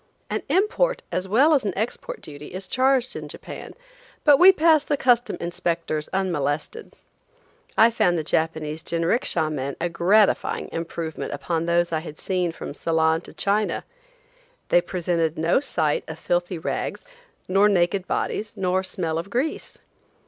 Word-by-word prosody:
An - - -1
import 475 +6 +1
as 185 +1 -2
well 265 +11 +4
as 280 - +3
an 200 -3 -1
export 345 - -3
duty 150 +3 -10
is 190 +1 -6
charged 260 -1 +2
in - - -6
Japan, - - -9 0.5
but 290 -2 +6
we 370 +2 +10
passed 320 -4 +3
the 290 - +1
custom 245 -3 +2
inspectors 170 -3 -2
unmolested. 175 - -2 0.8
I 230 +1 +7
found 175 -6 +2
the 160 - -1
Japanese 160 0 -1
jinricksha 165 - 0
men 140 -2 -3
a 175 - -1
gratifying 195 +5 +2
improvement 165 -2 -4
upon 165 +3 -2
those 170 0 +2
I 160 0 -3
seen 180 +1 -1
from 165 - -7
Ceylon 160 +1 +1
to - - -13
China. 205 +1 0 0.9
They - - +5
presented 170 - -1
no 165 +7 +3
sight 160 - 0
of 160 - -7
filthy 175 +2 -1
rags, 160 - -4 0.4
nor 195 +3 +4
naked 185 0 +1
bodies, 210 0 -2
nor 185 0 0
smell 165 -4 -3
of 170 - -6
grease. 260 +9 -3
175 Hz, 150 wpm, -24 LUFS, 160-230 Hz, 0.9 s, we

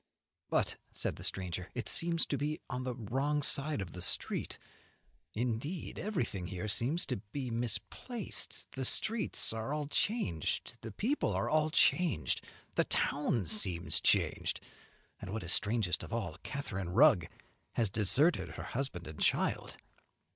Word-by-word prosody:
"But," - - +1
said - - -2
the - - -9
stranger, 90 -1 -3
"it 120 -4 -3
seems 165 -1 +2
to - - -1
be 150 +2 -2
on 125 +1 -3
the 125 -1 -2
wrong 135 +6 -1
side 140 -3 +2
of 95 - -5
the 90 - -8
street. 90 - 0 0.8
Indeed, 125 - -2
everything 170 - -2
here 95 +3 -4
seems 130 - +1
to - - -2
be 120 +6 -5
misplaced. 125 - -2
The 135 - -4
streets 215 - +2
are 110 +3 -3
all 150 -1 -2
changed, 145 - -1
the 110 - -6
people 245 - 0
are - - -1
all 155 0 +3
changed, 155 - +3 0.3
the - - +2
town 130 -8 0
seems 85 -3 0
changed, - - +3 0.6
and, 100 - -6
what 110 0 -3
is 85 - +2
strangest 105 -4 +2
of - - -8
all, 110 -8 -2
Catharine 100 -11 -4
Rugg 110 - +5 0.5
has 110 -5 +1
deserted 130 - +5
her - - -5
husband 120 -9 -2
and 75 0 -9
child." - - +1
120 Hz, 145 wpm, -33 LUFS, 95-150 Hz, 0.8 s, Rugg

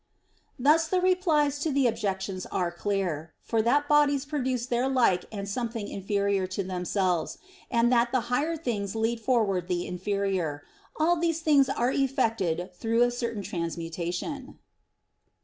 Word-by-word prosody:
Thus 305 +5 +4
the 370 +3 +1
replies 330 -6 +2
to 310 +1 -1
the 275 -1 +2
objections 195 -4 -2
are 175 -2 -1
clear. 175 -4 -2
For 225 -1 +1
that 285 +6 +2
bodies 290 -2 +3
produce 260 -4 -1
their 250 +1 0
like 235 -9 +2
or 200 -2 -5
something 225 0 -3
inferior 200 -1 -1
to 200 - 0
themselves, 180 -1 -1 0.3
and 240 0 +3
that 235 0 +3
the 255 -1 +2
higher 290 +8 -1
things 215 -9 -3
lead 225 +1 0
forward 215 -7 +1
the 175 -1 -1
inferior 185 -5 -2 0.3
all 335 +3 +3
these 330 -1 0
things 285 -4 +4
are 250 -1 +1
effected 225 - 0
through 225 +6 +1
a 245 - +2
certain 235 -4 -3
transmutation. 175 - -4
230 Hz, 145 wpm, -27 LUFS, 190-270 Hz, 0.3 s, Thus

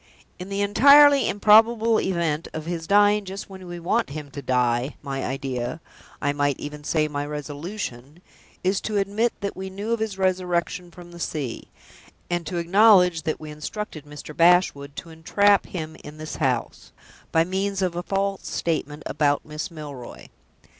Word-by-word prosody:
In 180 +2 -7
the 200 0 -2
entirely 280 +6 +7
improbable 220 +2 +5
event 170 -4 -1
of 155 0 -5
his 165 -1 -4
dying 205 +1 +4
just 195 +1 -8
when 190 -1 -10
we 175 0 -7
want 220 +7 0
him 145 0 -7
to 140 - -7
die, 125 +1 0
my 135 -1 -4
idea 130 +1 -3 0.4
I 145 0 0
might 145 -1 0
even 150 0 -7
say, 155 0 +1
my 145 -1 -3
resolution 150 - -6 0.4
is 190 +2 +1
to 215 -1 -2
admit 205 +4 +1
that 200 - -3
we 190 0 -6
knew 200 +4 -5
of 230 - -1
his 220 -3 -3
resurrection 180 -1 -1
from 175 0 -13
the 170 - -11
sea; 145 -8 -4 0.6
and 175 -2 -1
to 175 - -3
acknowledge 180 -1 +5
that 160 -1 -3
we 155 -1 -8
instructed 155 +1 -6
Mr. 150 +1 -10
Bashwood 165 -5 +3
to 165 - -8
entrap 200 +5 +2
him 160 -3 -6
into 150 +1 -11
this 155 0 -6
house, 130 -6 -2 0.4
by 165 - +4
means 190 +2 -2
of 180 -2 -1
a 175 - -2
false 195 +1 -2
statement 155 -2 -2
about 145 -1 +1
Miss 155 +3 -5
Milroy. 145 -7 -9
170 Hz, 165 wpm, -24 LUFS, 150-195 Hz, 0.6 s, entirely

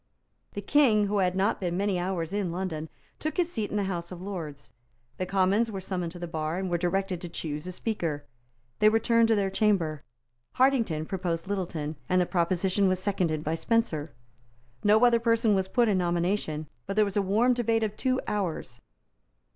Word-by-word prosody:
The 205 - -5
King, 225 -5 +4
who 205 0 0
had 185 -1 +1
not 195 +3 +1
been 175 -2 -2
many 195 -2 0
hours 175 -2 -2
in 200 -4 -1
London, 165 -3 -4 0.3
took 310 +4 -3
his 350 -1 +1
seat 215 -7 -2
in 210 - -2
the 205 - +1
House 175 -2 -4
of 180 - -7
Lords. 165 -7 -7 0.5
The 185 - -2
Commons 195 +4 +2
were 200 -3 -4
summoned 180 -3 -3
to - - -9
the 175 - -5
bar, 160 0 -3
and 190 -1 -3
were 175 - +2
directed 185 0 -1
to 175 - -6
choose 155 -1 -5
a - - -4
Speaker. 170 -7 -3 0.5
They 215 - +6
returned 230 +1 +3
to 225 - +3
their 195 -2 0
Chamber. 190 -8 +1 0.5
Hartington 235 - +2
proposed 175 -3 -3
Littleton; 170 -6 -3
and 185 - +3
the 180 - +3
proposition 185 +2 +1
was 185 0 +2
seconded 180 -6 -1
by 155 - -1
Spencer. 165 -3 0 0.7
No 215 +3 +5
other 235 -1 +5
person 230 -1 +3
was 190 -1 +1
put 240 +4 +2
in 200 -3 +2
nomination; 175 -3 -1 0.2
but 195 - -3
there 215 0 +4
was 200 - -5
a 205 - +3
warm 215 +6 +3
debate 230 -2 +1
of 210 -1 -2
two 255 +1 0
hours. 195 -6 -3
190 Hz, 195 wpm, -28 LUFS, 170-210 Hz, 0.7 s, They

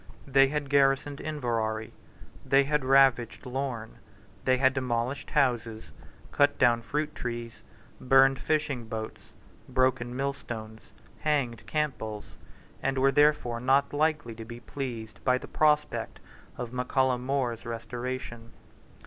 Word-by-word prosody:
They 135 0 +5
had 145 0 -3
garrisoned 140 0 +2
Inverary: 115 -7 -2 0.5
they 135 0 +4
had 150 0 0
ravaged 130 -2 +3
Lorn: 125 -3 -4 0.5
they 130 0 +4
had 130 +1 +3
demolished 125 0 -2
houses, 115 - 0 0.4
cut 145 0 +3
down 120 -2 +4
fruit 150 +5 -2
trees, 120 -1 -6 0.4
burned 135 +1 +5
fishing 145 -6 -1
boats, 110 -1 -6 0.5
broken 130 -2 +1
millstones, 120 -5 -5 0.4
hanged 125 -7 -1
Campbells, 120 -9 -2 0.6
and 135 0 -1
were 135 +1 +4
therefore 145 -5 +3
not 135 +3 +2
likely 145 -5 0
to 115 0 -8
be 120 +1 -9
pleased 120 -5 -6
by 125 -1 +3
the - - -9
prospect 150 -1 +1 0.4
of 120 0 -5
Mac 125 0 -3
Callum 130 -2 +2
Mores 130 -4 -1
restoration. 120 0 -6
130 Hz, 125 wpm, -28 LUFS, 115-140 Hz, 0.6 s, They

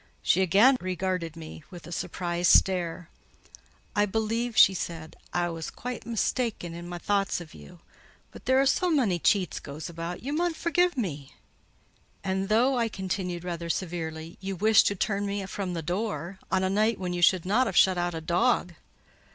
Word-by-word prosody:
She 190 - +3
again 205 +9 +5
regarded 180 -2 -2
me 160 -1 -10
with 175 -4 -11
a 170 - -10
surprised 175 0 0
stare. 175 -2 +2 0.8
"I 205 0 +3
believe," 225 +3 -1
she 195 - +8
said, 165 -3 -6 0.2
"I 175 0 0
was 165 -2 -5
quite 250 0 -7
mista'en 230 -5 -1
in 170 +1 -8
my 175 - -5
thoughts 200 +1 0
of 165 -3 -11
you: 175 -2 -14 0.5
but - - -13
there 260 0 +4
is 270 - +4
so 365 - 0
mony 240 - +2
cheats 190 +1 +1
goes 150 +3 -7
about, 170 +3 -6
you 280 +3 -3
mun 340 +1 0
forgie 355 +2 +2
me." 150 - -4 0.9
"And 190 +1 -1
though," 245 +4 +3
I 230 -1 +1
continued, 185 -3 -4
rather 170 -1 -4
severely, 165 -2 -4
"you 195 0 -4
wished 215 +3 +5
to 200 - 0
turn 200 +1 -1
me 200 -1 -3
from 190 -2 -4
the 165 - -4
door, 180 0 -3
on 190 0 +2
a - - +2
night 215 +2 +2
when 180 -1 -3
you 175 - -2
should 180 0 +4
not 230 +7 +2
have 190 - -2
shut 185 -2 +5
out 175 -1 -1
a 160 - -4
dog." 175 +2 +1
185 Hz, 185 wpm, -27 LUFS, 170-215 Hz, 0.9 s, she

